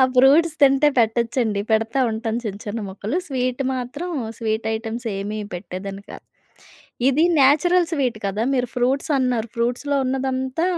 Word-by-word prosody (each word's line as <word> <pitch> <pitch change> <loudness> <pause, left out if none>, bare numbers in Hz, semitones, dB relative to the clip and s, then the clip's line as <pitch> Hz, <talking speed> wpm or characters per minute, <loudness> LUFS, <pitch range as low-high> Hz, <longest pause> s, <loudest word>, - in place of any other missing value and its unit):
Fruits 290 +6 +5
తింటే 275 +1 +5
పెట్టొచ్చండి. 230 -2 +1
పెడతా 225 +4 +1
ఉంటాను 225 +1 -2
చిన్న, 205 -3 -4
చిన్న 215 +2 -3
ముక్కలు. 205 - -3
స్వీట్ 255 -2 -1
మాత్రం 260 +7 -4 0.3
స్వీట్ 220 -1 -2
ఐటెమ్సేమీ 220 -2 -4
పెట్టేదాన్ని 190 +2 -6
కాదు. - - -10 0.9
ఇది 285 +4 +2 0.2
న్యాచురల్ 325 +6 +4
స్వీట్ 260 -8 -1
కదా! 205 +3 -1
మీరు 250 -2 +1
ఫ్రూట్సన్నారు, 250 -2 +1
ఫ్రూట్స్‌లో 245 +5 0
ఉన్నదంతా 265 +3 -1
245 Hz, 120 wpm, -22 LUFS, 220-270 Hz, 0.9 s, Fruits